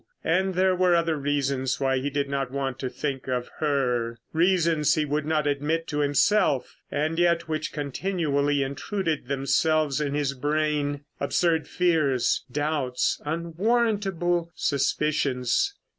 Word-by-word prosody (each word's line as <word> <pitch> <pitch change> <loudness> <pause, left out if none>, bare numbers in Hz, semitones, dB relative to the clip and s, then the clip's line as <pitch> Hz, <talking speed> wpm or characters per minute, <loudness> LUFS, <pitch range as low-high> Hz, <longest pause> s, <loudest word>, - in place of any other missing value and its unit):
And 185 +3 +1
there 185 0 +3
were 180 -1 +3
other 165 -1 +1
reasons 140 -2 -1
why 135 -1 +1
he 140 +2 -2
did 140 0 -1
not 140 -1 -2
want 135 -1 -3
to 130 - -3
think 135 0 -4
of 125 -1 -2
her; 125 -6 0 0.2
reasons 165 -3 +3
he 155 - +1
would 150 +1 -2
not 155 -1 +1
admit 150 +3 0
to 150 - -2
himself, 145 +1 +2
and 155 +3 -1
yet 170 -1 +2
which 155 -1 -2
continually 145 -2 0
intruded 155 - -3
themselves 140 +2 +1
in 145 -1 -1
his 145 -2 0
brain. 145 0 -1 0.2
Absurd 160 +3 +1
fears; 155 -8 +1
doubts; 145 -3 -1
unwarrantable 175 0 0
suspicions. 140 - 0
150 Hz, 130 wpm, -26 LUFS, 140-170 Hz, 0.2 s, there